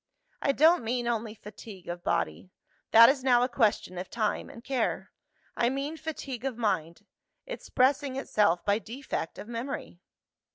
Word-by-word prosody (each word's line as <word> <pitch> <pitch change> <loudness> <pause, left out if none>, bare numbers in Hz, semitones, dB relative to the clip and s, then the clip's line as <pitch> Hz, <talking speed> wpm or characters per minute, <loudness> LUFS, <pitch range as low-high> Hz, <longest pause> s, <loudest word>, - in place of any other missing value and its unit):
"I 275 - +3
don't 320 +2 +5
mean 240 +1 -1
only 225 -2 -2
fatigue 205 -3 -11
of 175 0 -5
body: 185 - -1 0.4
that 230 +1 +9
is 265 0 +2
now 245 -2 +5
a - - +2
question 215 -7 0
of 180 - -6
time 220 -3 -1
and 230 - -12
care. 260 -3 -1 0.4
I 235 - +2
mean 275 +4 -3
fatigue 280 -6 -6
of 265 -4 -3
mind 185 -8 -1 0.4
expressing 275 - 0
itself 210 -9 +1
by 205 +1 +2
defect 230 -5 -5
of - - -8
memory. 235 -6 -5
235 Hz, 155 wpm, -29 LUFS, 210-270 Hz, 0.4 s, that